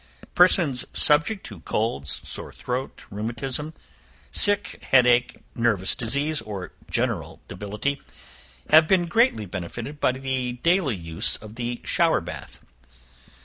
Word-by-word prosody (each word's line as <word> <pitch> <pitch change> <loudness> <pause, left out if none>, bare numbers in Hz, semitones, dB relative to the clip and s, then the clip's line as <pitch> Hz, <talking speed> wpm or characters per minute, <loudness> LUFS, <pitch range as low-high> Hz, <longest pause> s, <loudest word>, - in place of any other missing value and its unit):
Persons 170 -8 +4
subject 165 +8 +3
to 100 -5 -9
colds, 80 -7 -2
sore - - -5
throat, 125 +1 -5
rheumatism, 120 +8 -4 0.6
sick 205 -2 +1
head 125 -2 +5
ache, 125 0 +3 0.2
nervous 115 -6 +1
disease, 140 +6 0
or 100 -4 -7 0.2
general - - -1
debility, 105 +8 -3 0.7
have 155 +1 +8
been 180 -1 +3
greatly 200 - +2
benefited 105 - -6
by 130 - +2
the 130 -2 -2
daily 170 - +3
use 85 -2 0
of 105 0 -11
the 120 +1 -4
shower 170 -1 +3
bath. 80 -4 -9
125 Hz, 120 wpm, -24 LUFS, 105-155 Hz, 0.7 s, have